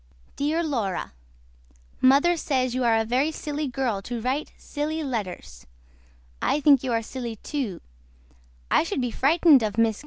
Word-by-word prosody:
DEAR 310 +4 0
LAURA 230 - -2 0.9
MOTHER 280 +7 +5
SAYS 260 -6 -1
YOU 255 0 -1
ARE 230 -2 +3
A 225 - 0
VERY 260 +7 +1
SILY 300 -1 -4
GIRL 245 -6 -2
TO 240 +3 -5
RITE 260 +6 -1
SUCH - - -26
SILY 310 +2 -4
LETTERS 185 - -5 0.7
I 295 - +1
THINK 280 -3 +5
YOU 260 - -2
ARE 230 -1 0
SILY 240 -1 -6
TO 255 - -4 0.9
I - - +5
SHOOD 330 -4 -2
BE 245 -1 -2
FRITENED 295 +2 +5
OF 215 -2 -1
MRS. 225 -2 +1
260 Hz, 160 wpm, -25 LUFS, 230-295 Hz, 0.9 s, MOTHER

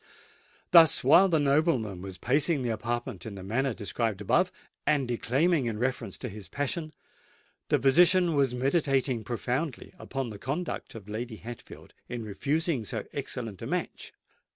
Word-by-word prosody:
Thus, 165 -3 +7
while 170 +9 +6
the 160 -3 +3
nobleman 140 - +1
was 95 -1 -7
pacing 140 - +1
the 120 - 0
apartment 120 +2 -3
in 110 -3 -7
the 95 - -8
manner 130 +7 0
described 110 -1 -2
above, 105 - +2 0.3
and 145 -4 +1
declaiming 135 +5 +1
in 110 -2 -2
reference 130 +3 -2
to 125 - -5
his 100 -4 -9
passion, 155 - -2 0.8
the - - +3
physician 175 +5 +5
was 135 -4 +2
meditating 135 -3 +1
profoundly 125 - -3
upon 135 -4 -4
the 105 - -9
conduct 145 - -4
of 105 -3 -10
Lady 110 +2 -5
Hatfield 120 +2 -11 0.2
in 120 -2 -4
refusing 140 - -1
so 105 +1 -4
excellent 120 -7 -4
a - - -5
match. - - -3
125 Hz, 155 wpm, -28 LUFS, 110-145 Hz, 0.8 s, Thus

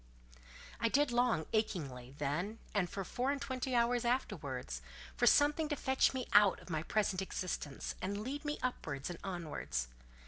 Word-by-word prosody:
I 230 - +2
did 285 +1 +3
long, 240 -9 +2
achingly, 140 - -1
then 170 +10 -1 0.2
and 190 -4 +1
for 195 - -3
four 250 +7 -1
and 285 - -1
twenty 260 -2 -2
hours 240 0 +3
afterwards, 145 - -2 0.3
for - - +3
something 295 +2 +5
to 295 - +1
fetch 265 -1 +3
me 260 -2 -3
out 205 -2 +7
of - - -11
my 155 -1 0
present 195 +1 +1
existence, 180 -7 -3
and 200 +2 -2
lead 280 +5 -4
me 295 0 -2
upwards 150 - -2
and 175 - -7
onwards. 165 - -3
205 Hz, 165 wpm, -35 LUFS, 160-255 Hz, 0.3 s, out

